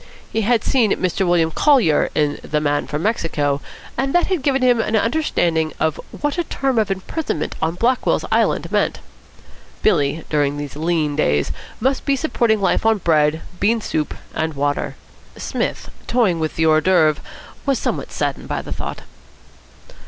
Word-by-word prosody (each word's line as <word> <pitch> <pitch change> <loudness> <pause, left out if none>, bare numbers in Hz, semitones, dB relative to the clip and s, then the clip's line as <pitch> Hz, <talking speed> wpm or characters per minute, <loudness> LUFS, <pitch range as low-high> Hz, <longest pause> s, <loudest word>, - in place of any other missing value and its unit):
He 225 - +1
had 230 +1 +2
seen 235 -7 +2
Mr 185 +1 0
William 170 -2 +3
Collier 235 - +3
in 150 -1 +1
The 150 - -1
Man 145 -1 0
from 150 +1 -3
Mexico, 150 -9 0 0.3
and 270 +4 -1
that 350 - +4
had 370 -6 -1
given 270 -1 +1
him 245 -2 +4
an 225 0 0
understanding 175 - +1
of 160 -1 0
what 295 +3 -3
a - - +2
term 270 -6 0
of 215 - +1
imprisonment 195 - -3
on 160 +1 0
Blackwell's 245 +7 +1
Island - - +1
meant. - - +1 0.8
Billy, 155 -5 +2
during 145 -1 0
these 145 -1 -6
lean 155 -2 0
days, 75 - +1 0.3
must 265 +3 0
be 280 - +2
supporting 235 -6 +1
life 195 - +1
on 225 -1 +3
bread, 160 -3 +2 0.2
bean 225 +3 +2
soup, 155 -7 -2 0.2
and 160 -1 -2
water. 145 +1 -1 0.4
Psmith, - - -3 0.2
toying 215 -9 +2
with 155 -1 -2
the 160 - +1
hors 155 0 +4
d'oeuvre, 160 -5 +3 0.5
was 275 -2 +3
somewhat - - -3
saddened - - -2
by - - -3
the - - -5
thought. - - -5
175 Hz, 165 wpm, -20 LUFS, 155-240 Hz, 0.8 s, that